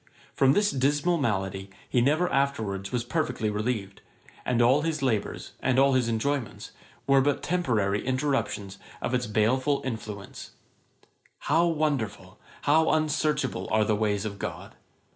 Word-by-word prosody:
From 135 0 +4
this 205 +5 +2
dismal 145 +6 +1
malady 95 -5 -2 0.2
he 125 - +2
never 155 +8 +2
afterwards 110 -9 -1
was 125 -1 -1
perfectly 125 -5 -1
relieved; 105 -2 -3 0.4
and 125 -1 +1
all 125 +5 +4
his 155 -2 -2
labours, 115 -6 -1
and 130 0 +1
all 135 0 +5
his 130 -2 +2
enjoyments, 120 +1 -2 0.3
were 135 -1 +5
but 145 +1 0
temporary 115 - 0
interruptions 130 -7 -2 0.2
of 120 - -3
its 125 -2 0
baleful 130 +7 +1
influence. 110 -5 -7 0.9
How 165 +4 +2
wonderful, 130 - -2 0.2
how 160 +2 +4
unsearchable 155 -9 0
are 110 0 +3
the 105 - +1
ways 105 -1 0
of 100 -2 -5
GOD! - - -6
125 Hz, 140 wpm, -27 LUFS, 105-145 Hz, 0.9 s, all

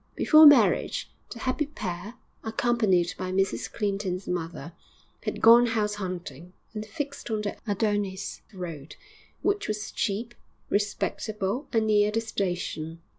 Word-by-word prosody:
Before 310 0 +8
marriage, 290 - +4 0.2
the - - -7
happy 260 +5 -1
pair, 200 - -6 0.3
accompanied 220 -6 +1
by 185 0 -3
Mrs 195 +1 0
Clinton's 195 -3 -2
mother, 165 -2 -4 0.5
had - - -3
gone 235 +2 +8
house 215 -3 0
hunting, 180 -4 -6 0.2
and 215 -1 -4
fixed 280 +4 -6
on 215 -1 -1
the 205 - -3
Adonis 205 -2 -1
Road, 165 -7 -7 0.5
which 405 0 0
was 215 0 -3
cheap, 225 +3 -2 0.4
respectable 210 +3 -1
and 225 -1 +2
near 210 -1 +4
the 220 +2 0
station. 175 -7 -3
205 Hz, 125 wpm, -27 LUFS, 185-225 Hz, 0.5 s, Before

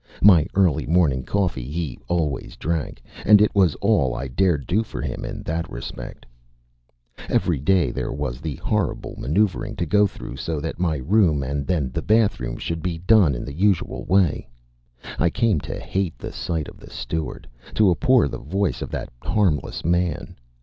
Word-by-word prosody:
My 90 -7 +7
early 90 -7 +2
morning 80 -6 +3
coffee 90 -9 -1
he 80 -3 -4
always 80 -6 -1
drank; 80 -6 -3 0.2
and 105 -1 +7
it 105 - +3
was 95 -6 +3
all 80 - +2
I 65 +3 -4
dared 80 0 +1
do 100 +5 +1
for 110 - -7
him - - -4
in - - -6
that 80 0 -3
respect. - - -8 1.0
Every 80 -6 +1
day 80 -2 +2
there - - -3
was 65 -2 -4
the 75 -3 -4
horrible - - -2
maneuvering 105 - 0
to 85 - -2
go 105 +5 +4
through 65 -8 -9
so 80 +2 -3
that 80 +2 -5
my 85 -4 +1
room 80 - +2
and 70 +1 -3
then 80 -8 0
the - - -2
bathroom 100 - +1
should 80 -1 -4
be 85 0 -2
done 90 - +4
in - - -5
the 70 - -7
usual 95 +3 +1
way. 95 -9 +2 0.7
I 85 - +3
came 115 -4 +1
to - - -6
hate 95 -8 -2
the - - -7
sight 80 -4 -3
of - - -12
the - - -13
steward, 80 -1 -5 0.3
to 105 -4 +5
abhor 125 - +4
the - - -6
voice 95 +8 -1
of - - -4
that - - -4
harmless 90 -11 0
man. 85 -1 0
85 Hz, 175 wpm, -23 LUFS, 70-95 Hz, 1.0 s, My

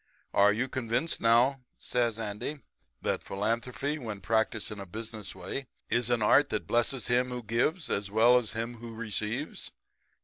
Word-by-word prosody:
Are 100 +1 +6
you 120 +5 0
convinced 130 +4 -1
now,' 120 +4 +4 0.2
says 120 -3 0
Andy, 115 +7 -4 0.4
'that - - 0
philanthropy 115 +8 -2
when 110 -6 -5
practiced 110 +1 0
in 105 - -6
a 100 - -7
business 110 0 -6
way 130 +9 -5 0.2
is 120 -1 +2
an 120 -3 +2
art 140 +7 +5
that - - -2
blesses 120 +2 +1
him 125 +1 +2
who 125 -1 -5
gives 120 - 0
as 100 0 -1
well 115 +4 +6
as 115 -3 -6
him 115 +1 -3
who 115 0 -8
receives?' 110 +5 -3
115 Hz, 165 wpm, -30 LUFS, 110-125 Hz, 0.4 s, Are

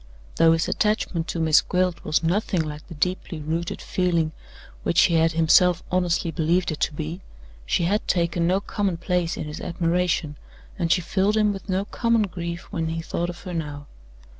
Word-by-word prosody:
Though 165 0 +6
his 165 +1 0
attachment 210 -6 0
to 170 - -3
Miss 160 -1 +5
Gwilt 180 -1 -1
was 155 - +1
nothing 185 +1 +1
like 150 0 -7
the 165 - -9
deeply 180 0 -2
rooted 160 +3 -3
feeling 170 -4 0 0.5
which 170 - +3
he 175 - +3
had 165 0 +3
himself 165 +2 +4
honestly 175 -2 +1
believed 170 +2 +1
it 155 - -5
to 155 - 0
be, 160 +5 -5 0.5
she 170 - +1
had 205 +5 0
taken 170 -1 +1
no 190 +2 +2
common 200 -4 -1
place 175 -1 -1
in - - -3
his 150 0 -7
admiration, 170 -3 0 0.4
and 170 -2 0
she 180 - +4
filled 195 +4 +1
him 210 -1 +3
with 195 +1 -9
no 190 +1 0
common 230 +1 +1
grief 170 -3 -4
when 165 -2 -2
he 165 +1 -2
thought 175 +1 -2
of 175 - -8
her 180 - -7
now. 145 -3 -4
170 Hz, 190 wpm, -24 LUFS, 165-185 Hz, 0.5 s, Though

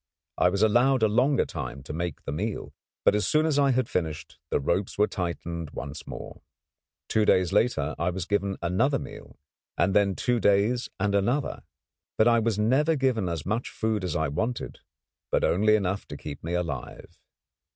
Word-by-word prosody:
I 90 - +5
was 100 +3 0
allowed 120 +3 +4
a - - +6
longer 125 +6 +2
time 70 +2 -6
to 75 - -7
make 85 +1 -4
the - - -4
meal, 100 +8 -4 0.3
but, - - +6
as 105 0 +1
soon 155 +1 +3
as 150 -3 +2
I 140 -1 +4
had 130 -2 +1
finished, 80 -3 -4
the - - +1
ropes 90 +7 -1
were 105 - +5
tightened 85 -4 -4
once 70 +3 -7
more. - - -8 0.7
Two 110 - +2
days 95 -2 +3
later 80 - +2
I 85 - +1
was 90 -1 -3
given 100 -1 -1
another 120 +12 +2
meal; - - -10 0.4
and 95 - +2
then 100 -2 +3
two 125 -1 0
days 105 +4 +2
and 105 -1 +1
another. 120 +8 0 0.6
But 110 - +5
I 115 -1 +5
was 115 -2 0
never 135 +9 +3
given 125 - +1
as 85 -3 -4
much 110 +5 -1
food 110 -3 -1
as 90 -4 -2
I 80 0 +1
wanted, 110 - -3 0.5
but - - +2
only 105 +4 +4
enough 100 -1 -1
to - - -7
keep 75 -2 -8
me 85 +2 -2
alive. 80 -8 -5
100 Hz, 185 wpm, -27 LUFS, 85-120 Hz, 0.7 s, a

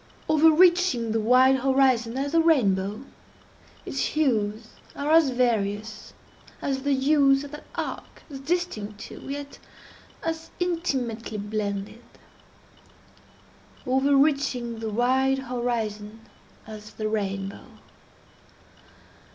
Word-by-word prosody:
Overreaching 320 -5 +4
the 225 - +1
wide 255 +4 +5
horizon 260 -3 +2
as 280 +1 -2
the 330 0 +4
rainbow, 210 - +2 0.8
its - - -4
hues 220 -7 0 0.3
are 285 +2 -2
as 320 -3 +5
various 220 -4 -1 0.5
as 270 -1 -2
the 285 0 +1
hues 275 0 +3
of 285 - -9
that 295 - -10
arch—as 275 -3 -7
distinct 270 - -3
too, - - -10
yet 285 0 -6 0.6
as 325 0 -4
intimately 265 -11 -2
blended. 205 +1 -4 1.8
Overreaching 270 -3 +1
the 225 -1 -4
wide 260 +4 +2
horizon 230 -4 -4 0.4
as 215 -1 -10
the 215 - -3
rainbow! 195 -2 -3
255 Hz, 95 wpm, -25 LUFS, 215-285 Hz, 1.8 s, wide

